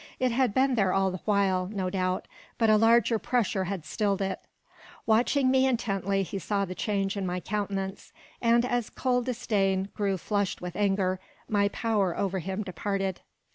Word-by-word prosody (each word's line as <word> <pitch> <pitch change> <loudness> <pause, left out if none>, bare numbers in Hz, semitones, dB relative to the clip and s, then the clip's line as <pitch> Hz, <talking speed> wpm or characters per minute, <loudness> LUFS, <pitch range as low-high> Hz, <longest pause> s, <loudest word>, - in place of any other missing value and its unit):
It 255 -1 +1
had 250 -1 +2
been 265 0 +3
there 195 -6 +2
all 195 -1 +2
the 185 - -6
while, 195 -3 +2
no 190 -2 -3
doubt, 185 -1 -1 0.3
but 225 -2 +4
a - - +6
larger 230 +1 +4
pressure 225 -6 0
had 185 -4 -4
stilled 200 +4 0
it. 190 -1 -2 0.7
Watching 255 +4 +3
me 265 0 +4
intently, 195 -5 0
he 195 +2 -5
saw 200 +1 -1
the 185 - -6
change 195 0 -1
in 200 - -2
my 180 0 -2
countenance, 195 -1 -4 0.3
and 235 0 +4
as 245 -2 -1
cold 250 -2 0
disdain 200 -6 0
grew 200 -3 0
flushed 200 +2 -1
with 180 -1 -6
anger, 195 -2 +1 0.3
my 205 -1 +2
power 205 -5 0
over 195 -1 -1
him 190 +4 -3
departed. 195 +1 -3
200 Hz, 175 wpm, -28 LUFS, 190-225 Hz, 0.7 s, a